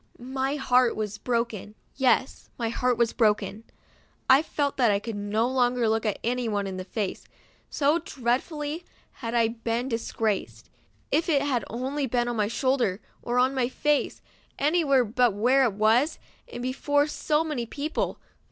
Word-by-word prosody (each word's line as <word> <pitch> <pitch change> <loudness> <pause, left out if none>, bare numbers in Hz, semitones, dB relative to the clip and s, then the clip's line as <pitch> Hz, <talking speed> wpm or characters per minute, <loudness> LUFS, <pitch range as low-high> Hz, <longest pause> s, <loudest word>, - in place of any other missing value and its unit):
My 265 +3 -2
heart 255 -3 +3
was 210 -1 -4
broken, 230 -4 -2 0.2
yes, 260 0 +1
my 230 -2 -1
heart 250 +1 0
was 235 -1 +2
broken. 210 -1 +1 0.6
I 265 +2 +7
felt 290 -3 -2
that 245 -4 +4
I 200 - +3
could 220 +2 -5
no 205 +3 0
longer 250 -2 +1
look 220 0 +1 0.2
anyone 230 -4 -1
in 190 -1 -5
the 185 - -4
face, 195 +1 -4 0.4
so 295 +3 +2
dreadfully 295 +5 -2 0.4
had 230 -1 -3
I 230 -1 +3
been 230 +2 -2
disgraced. 225 -3 -2 0.4
If 330 +2 +1
it 285 -3 +3
had 255 -6 0
only 265 +4 -2
been 240 0 0
on 240 - -2
my 210 -2 +1
shoulder 245 -5 0 0.2
or 240 +1 -2
on 255 +2 +3
my 255 -2 0
face; 295 +2 0 0.3
any 320 +4 +2
where 270 -4 +3
but 235 -1 +2
where 255 +6 +4
it 225 - 0
was, 225 +9 +2 0.3
and 245 - -6
before 285 +3 +1
so 300 +1 0
many 285 -7 -3
people. 300 +7 -3
245 Hz, 160 wpm, -26 LUFS, 225-275 Hz, 0.6 s, I